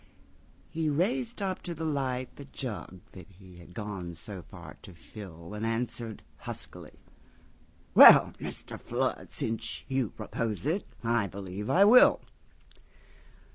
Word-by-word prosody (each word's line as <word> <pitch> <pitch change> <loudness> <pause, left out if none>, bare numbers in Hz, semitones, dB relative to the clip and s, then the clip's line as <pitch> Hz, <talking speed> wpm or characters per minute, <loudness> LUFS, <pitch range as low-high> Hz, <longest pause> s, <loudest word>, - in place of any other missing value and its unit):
He 160 -1 -1
raised 225 - -1
up 190 -1 -2
to 170 - -6
the 160 +1 -4
lightThe 135 -1 -3
jug 105 -8 -6
that 90 -3 -12
he 95 -2 -15
had 90 +1 -15
gone 100 -6 -5
so 95 +3 -7
far 75 - -12
to 90 - -13
fill, 85 -1 -11
And 105 +1 -5
answered 115 -1 -3
huskily: - - -8 1.0
"Well, - - +10
Mr. - - -6
Flood, - - -2
Since 110 0 -3
you 130 -5 0
propose 115 0 -4
it, 170 +7 0 0.2
I 115 -3 +1
believe 100 +1 -6
I 195 +2 +6
will." 245 +5 +7
115 Hz, 130 wpm, -29 LUFS, 95-145 Hz, 1.0 s, Well